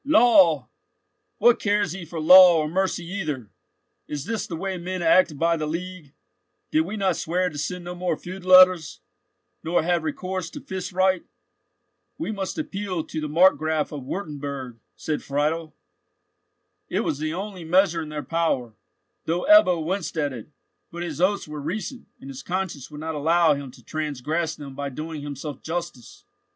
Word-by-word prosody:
"Law?—what 280 - +2
cares 205 -4 +1
he 185 0 -6
for 165 0 -6
law 180 +2 +9
or 155 -1 0
mercy 185 +1 -1
either? 155 - -4 0.6
Is 145 -2 -5
this 225 +1 -3
the 170 - -5
way 190 +2 -4
men 180 +1 -4
act 165 -2 +4
by 170 +2 +2
the 155 -2 -3
League? 170 -2 -6 0.6
Did 315 - +3
we 215 - -5
not 195 -2 +1
swear 180 +2 0
to 150 - -9
send 180 +4 -4
no 175 - -5
more 180 -3 -2
feud 185 +1 -9
letters, 185 -3 +6 0.6
nor 165 0 +1
have 175 0 +1
recourse 185 +2 -4
to - - -8
fist 190 -1 -6
right?" 185 0 +2 0.9
"We 310 - -3
must 195 - -4
appeal 200 - -3
to 155 - -5
the 150 - -3
Markgraf 155 -2 +3
of 145 -3 -6
Wurtemburg," 140 - -6 0.2
said 155 -1 -3
Friedel. 155 +2 -2 1.1
It - - 0
was 145 - -2
the 155 +1 -2
only 195 -2 -6
measure 170 0 +3
in 155 - -7
their 150 -1 -5
power, 160 -9 -1 0.5
though 170 +2 -1
Ebbo 185 - +6
winced 170 -2 -3
at 145 -3 0
it; 115 0 -9 0.4
but 170 +1 -5
his 175 - -5
oaths 200 0 +1
were 150 -1 -6
recent, 210 - -5
and - - -12
his 135 0 -8
conscience 180 -6 -4
would 150 -1 -9
not 160 0 -3
allow 160 +2 +3
him 140 -1 -6
to 125 - -16
transgress 155 +2 -2
them 140 -3 -9
by 140 +1 -4
doing 155 +3 -6
himself 145 0 -6
justice. 160 -7 -6
165 Hz, 170 wpm, -24 LUFS, 150-185 Hz, 1.1 s, law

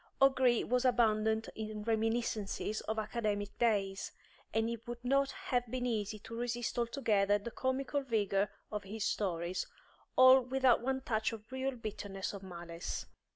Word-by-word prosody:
O'Gree 260 -3 +4
was 250 +1 +1
abundant 220 -3 +3
in 215 -1 -5
reminiscences 220 -2 -1
of 220 - -1
academic 210 -2 -2
days, 200 -4 +1 0.4
and 225 0 +1
it 235 0 -5
would 240 0 -6
not 275 +2 +3
have 265 -12 -2
been 250 +1 -2
easy 215 -3 -1
to 225 +2 -9
resist 240 0 -2
altogether 220 -5 +2
the 205 +3 -7
comical 270 +3 -1
vigour 205 -5 +1 0.2
of 210 -1 -3
his 210 +2 -4
stories, 180 -2 -1 0.5
all 260 +1 +8
without 255 -1 +3
one 265 +2 -1
touch 220 -4 0
of 220 +2 -10
real 260 0 -2
bitterness 205 -4 -5
or 200 - -5
malice. 170 -2 -6
225 Hz, 150 wpm, -34 LUFS, 210-250 Hz, 0.5 s, all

